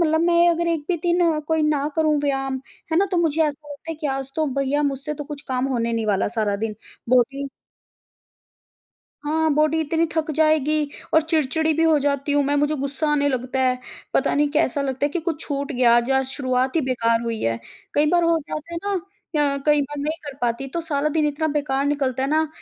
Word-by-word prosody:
मतलब 320 -1 +3
मैं 340 0 +4
अगर 340 0 +1
1 330 -2 0
भी 360 - +1
दिन 350 0 +2
अ, - - -1
कोई 320 -1 +1
ना 300 -1 +1
करूँ, 310 -2 +3
व्यायाम 270 -2 -1 0.3
है 320 - +3
ना 395 - +3
तो - - +2
मुझे 325 -2 +2
ऐसा 295 -1 -3
लगता 290 +3 -8
है - - -3
कि 300 - -1
आज 270 -1 -3
तो 315 -1 +1
भैया 275 +2 +1
मुझसे 280 +1 -2
तो 295 - -6
कुछ 290 0 -7
काम 255 0 0
होने 235 -3 -1
नहीं 225 -1 -1
वाला 200 -2 +1
सारा 205 -2 +1
दिन 215 0 -3 0.3
बहुत 245 -1 +5
ही 280 0 -4 1.8
हाँ, 315 +2 +1
बॉडी 310 +2 +2
इतनी 325 +2 +1
थक 320 -1 0
जाएगी 310 -1 +3 0.4
और 320 - +6
चिड़चिड़ी 315 0 +1
भी 325 - +1
हो 320 -2 +4
जाती 280 0 0
हूँ 290 0 +3
मैं, 285 +1 +1
मुझे 295 +1 +2
गुस्सा 280 +2 -2
आने 285 -1 +2
लगता 260 0 -2
है, 255 -1 +2 0.4
पता - - +2
नहीं 295 0 +2
कैसा 295 -2 +1
लगता 265 0 -2
है - - -1
कि 350 - -2
कुछ 325 -1 -3
छूट 280 0 -3
गया, 245 -2 +4
आज, 240 +2 +1
आज 265 0 +3
शुरुआत 260 0 -1
ही - - +4
बेकार 230 -4 +1
हुई 230 -2 -3
है। 115 0 0 0.4
कई 295 +1 +3
बार 350 -1 +3
हो 335 0 +3
जाता 320 +2 -6
है 335 - -2
ना, 405 - -1 0.6
अ, - - -2
कई 295 -1 +4
बार 290 +1 -6
नहीं 305 +3 -2
कर 285 -2 -7
पाती, 240 +3 -1
तो 335 +6 -3
सारा 305 -3 -1
दिन 305 0 +1
इतना 300 +2 -1
बेकार 275 -1 -1
निकलता 270 -3 0
है 270 - 0
ना, 315 +1 +2
290 Hz, 230 wpm, -22 LUFS, 265-315 Hz, 1.8 s, और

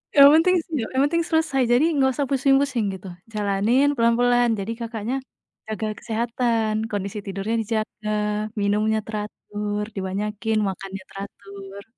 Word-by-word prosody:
Yang 280 -1 +10
penting 365 +3 +4
sia 300 -10 -2
yang 265 - +4
penting 335 +3 +1
selesai 315 -5 +1
jadi 245 +5 +5
nggak 265 -1 +3
usah 285 - 0
pusing-pusing 270 -3 +2
gitu. 190 +1 -10 0.3
Jalanin 210 +7 +2
pelan-pelan 240 +1 +3
jadi, 200 +4 -3
Kakaknya, 230 +1 -3 0.5
jaga 220 0 -3
kesehatan 230 -1 0 0.2
kondisi 200 0 -3
tidurnya 200 +3 -2
dijaga, 215 -1 -3 0.5
minumnya 210 +2 +2
teratur, 210 -1 -4
dibanyakin 210 +3 -2
makannya 195 0 -6
teratur. 200 0 -9
220 Hz, 125 wpm, -23 LUFS, 205-250 Hz, 0.5 s, Yang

